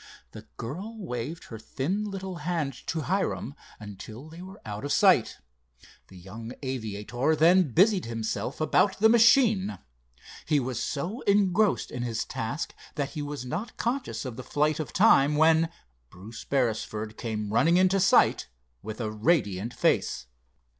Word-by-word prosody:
The -, -, -12 dB
girl 185 Hz, -, -6 dB
waved 155 Hz, -, -5 dB
her 115 Hz, -, -8 dB
thin 170 Hz, -, -3 dB
little 190 Hz, -2 st, -6 dB
hand 155 Hz, -3 st, -2 dB
to 165 Hz, -2 st, -2 dB
Hiram 185 Hz, -5 st, -2 dB, 0.3 s
until 110 Hz, +6 st, -10 dB
they 165 Hz, +2 st, -11 dB
were 190 Hz, +2 st, -11 dB
out 105 Hz, -1 st, -6 dB
of 145 Hz, -, -3 dB
sight. -, -, +4 dB, 0.7 s
The 95 Hz, -, -14 dB
young 110 Hz, +7 st, -9 dB
aviator 120 Hz, +3 st, -2 dB
then 170 Hz, 0 st, +4 dB
busied 195 Hz, -, +4 dB
himself 115 Hz, +1 st, -4 dB
about 190 Hz, +5 st, +2 dB
the 220 Hz, +2 st, +5 dB
machine. 225 Hz, -3 st, +4 dB, 0.7 s
He 150 Hz, -2 st, +3 dB
was 125 Hz, -2 st, -3 dB
so 180 Hz, -, -3 dB
engrossed 200 Hz, 0 st, +2 dB
in 125 Hz, -, -5 dB
his 115 Hz, -2 st, -2 dB
task 115 Hz, +8 st, -4 dB, 0.2 s
that 145 Hz, -2 st, -2 dB
he 155 Hz, -, -5 dB
was 145 Hz, -3 st, -5 dB
not 175 Hz, -, -5 dB
conscious 250 Hz, -, -2 dB
of 125 Hz, -3 st, -6 dB
the 130 Hz, -, -6 dB
flight 150 Hz, +4 st, 0 dB
of 155 Hz, -, -4 dB
time, 150 Hz, -8 st, +5 dB
when 160 Hz, +1 st, +4 dB, 0.4 s
Bruce 110 Hz, -, -11 dB
Beresford 110 Hz, -4 st, -1 dB
came 105 Hz, -3 st, -4 dB
running 165 Hz, +9 st, +4 dB
into 185 Hz, +1 st, +3 dB
sight -, -, +4 dB, 0.3 s
with 110 Hz, +2 st, -7 dB
a 110 Hz, -3 st, -2 dB
radiant 110 Hz, -, 0 dB
face. 65 Hz, -, 0 dB
145 Hz, 150 wpm, -27 LUFS, 115-185 Hz, 0.7 s, the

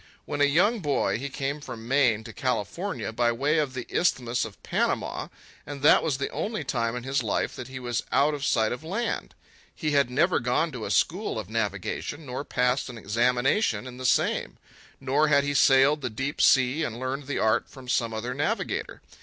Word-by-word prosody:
When 145 Hz, -1 st, -3 dB
a -, -, +7 dB
young 185 Hz, +11 st, +3 dB
boy 145 Hz, -, 0 dB
he 140 Hz, +2 st, -4 dB
came 140 Hz, +2 st, -3 dB
from 115 Hz, -4 st, -8 dB
Maine 125 Hz, -5 st, +3 dB
to -, -, -10 dB
California -, -, -2 dB
by 120 Hz, 0 st, +2 dB
way 145 Hz, +7 st, +1 dB
of 140 Hz, -4 st, -1 dB
the 125 Hz, -, -4 dB
Isthmus 125 Hz, -9 st, 0 dB
of 110 Hz, -2 st, -12 dB
Panama, -, -, -1 dB, 0.4 s
and 140 Hz, 0 st, -8 dB
that 150 Hz, -, +7 dB
was 145 Hz, -5 st, 0 dB
the 140 Hz, -, -3 dB
only 210 Hz, -5 st, -3 dB
time 115 Hz, -4 st, -1 dB
in 125 Hz, -, -5 dB
his 135 Hz, +1 st, 0 dB
life 110 Hz, -, -1 dB
that 125 Hz, -, -7 dB
he 130 Hz, 0 st, -7 dB
was 120 Hz, -2 st, -2 dB
out 145 Hz, +2 st, +3 dB
of 145 Hz, -2 st, -4 dB
sight 110 Hz, -6 st, +2 dB
of 125 Hz, +5 st, -5 dB
land. 205 Hz, +9 st, -3 dB, 0.4 s
He 155 Hz, -3 st, -2 dB
had 140 Hz, -3 st, +3 dB
never 165 Hz, +8 st, +2 dB
gone 125 Hz, +7 st, 0 dB
to 125 Hz, -5 st, -6 dB
a -, -, -4 dB
school 185 Hz, -, +1 dB
of 110 Hz, -2 st, -6 dB
navigation, 110 Hz, -, -3 dB
nor 130 Hz, +1 st, -4 dB
passed 125 Hz, -1 st, 0 dB
an 120 Hz, -, -8 dB
examination 120 Hz, -, +1 dB
in 125 Hz, -1 st, -9 dB
the 130 Hz, -, -6 dB
same; -, -, +1 dB, 0.4 s
nor 140 Hz, +3 st, +2 dB
had 140 Hz, -2 st, +4 dB
he 145 Hz, 0 st, -1 dB
sailed 135 Hz, +2 st, +5 dB
the -, -, -2 dB
deep 135 Hz, +6 st, -3 dB
sea 130 Hz, +3 st, +4 dB
and 120 Hz, -5 st, -4 dB
learned 130 Hz, +2 st, -4 dB
the 145 Hz, -, -2 dB
art 110 Hz, +2 st, +1 dB
from 130 Hz, -2 st, -13 dB
some 115 Hz, -2 st, +1 dB
other 110 Hz, +3 st, -3 dB
navigator. 210 Hz, -, -2 dB
130 Hz, 205 wpm, -26 LUFS, 120-145 Hz, 0.4 s, a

